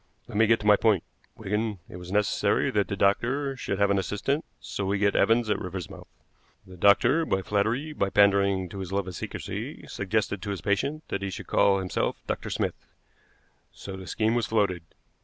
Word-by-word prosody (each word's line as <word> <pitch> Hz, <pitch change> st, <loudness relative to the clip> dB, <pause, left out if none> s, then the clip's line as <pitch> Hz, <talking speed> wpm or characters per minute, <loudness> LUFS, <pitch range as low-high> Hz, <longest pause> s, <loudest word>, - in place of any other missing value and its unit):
"Let -, -, -10 dB
me 110 Hz, +1 st, +4 dB
get 115 Hz, +1 st, +4 dB
to -, -, -8 dB
my 105 Hz, -1 st, +6 dB
point, 105 Hz, -6 st, +3 dB, 0.3 s
Wigan. 105 Hz, +1 st, -2 dB
It -, -, -9 dB
was 90 Hz, 0 st, -9 dB
necessary 105 Hz, 0 st, +1 dB
that 105 Hz, -1 st, +1 dB
the 100 Hz, -, -3 dB
doctor 125 Hz, +8 st, +1 dB
should 100 Hz, -6 st, -3 dB
have 100 Hz, 0 st, +3 dB
an 100 Hz, -, +3 dB
assistant, 105 Hz, -, -1 dB, 0.2 s
so 100 Hz, -, -5 dB
we 100 Hz, +1 st, 0 dB
get 100 Hz, 0 st, +2 dB
Evans 115 Hz, 0 st, +3 dB
at 105 Hz, -2 st, 0 dB
Riversmouth. 90 Hz, -2 st, -7 dB, 0.6 s
The 95 Hz, -, -12 dB
doctor, 115 Hz, -, +4 dB
by 95 Hz, -11 st, -1 dB
flattery, 115 Hz, +11 st, 0 dB
by 100 Hz, -9 st, 0 dB
pandering 100 Hz, -2 st, +3 dB
to 100 Hz, -, -7 dB
his 95 Hz, -1 st, -6 dB
love 100 Hz, -1 st, -1 dB
of 95 Hz, -, -5 dB
secrecy, -, -, -6 dB
suggested 100 Hz, 0 st, -2 dB
to 100 Hz, -, -5 dB
his 100 Hz, -2 st, -3 dB
patient 140 Hz, +10 st, -1 dB
that 100 Hz, -, -2 dB
he 100 Hz, -, -2 dB
should 95 Hz, -, -7 dB
call 100 Hz, -1 st, +3 dB
himself 95 Hz, -1 st, -2 dB
Dr. -, -, -3 dB
Smith. -, -, -3 dB, 0.9 s
So 95 Hz, -, -8 dB
the 95 Hz, -1 st, -9 dB
scheme 110 Hz, 0 st, +1 dB
was 120 Hz, -2 st, 0 dB
floated. 100 Hz, -6 st, +1 dB
100 Hz, 195 wpm, -27 LUFS, 95-110 Hz, 0.9 s, my